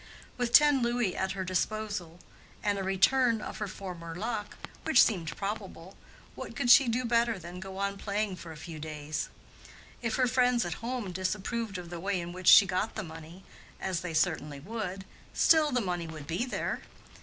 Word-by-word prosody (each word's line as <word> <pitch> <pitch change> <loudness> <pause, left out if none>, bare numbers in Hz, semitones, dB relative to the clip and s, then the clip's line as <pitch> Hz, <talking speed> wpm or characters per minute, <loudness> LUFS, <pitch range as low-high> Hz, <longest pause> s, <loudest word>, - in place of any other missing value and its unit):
With 245 -2 -1
ten 295 -2 +6
louis 240 -5 0
at 190 0 -1
her 190 -1 -3
disposal 185 -2 -2 0.4
and 205 -2 +1
a - - -2
return 225 +5 +3
of - - -7
her 210 - -2
former 175 -4 -7
luck, 210 +2 -4 0.3
which - - +6
seemed 170 -8 -1
probable, 195 -3 -5 0.4
what - - -8
could 245 -4 +3
she 270 +1 +8
do 240 +2 0
better 235 -1 +2
than 175 0 -9
go 190 0 -8
on 200 0 -2
playing 205 -2 -2
for 165 -1 -9
a 160 - -9
few 160 0 -8
days? 155 0 -4 0.7
If 230 -2 -1
her 255 - +3
friends 250 -2 +2
at 175 - -2
home 235 -4 -3
disapproved 195 +3 -2
of 175 -1 -8
the 175 - -5
way 195 +1 -1
in 175 0 -6
which 185 -1 -6
she 200 - +10
got 190 +4 -1
the 215 - -3
money, 165 +2 -10 0.4
as 185 -3 -2
they 170 -3 -4
certainly 150 -4 0
would, 195 +1 -5 0.3
still 310 -2 +5
the 250 - +2
money 175 -4 -2
would 155 -3 -8
be 170 - -1
there. 255 - -3
195 Hz, 190 wpm, -30 LUFS, 175-230 Hz, 0.7 s, she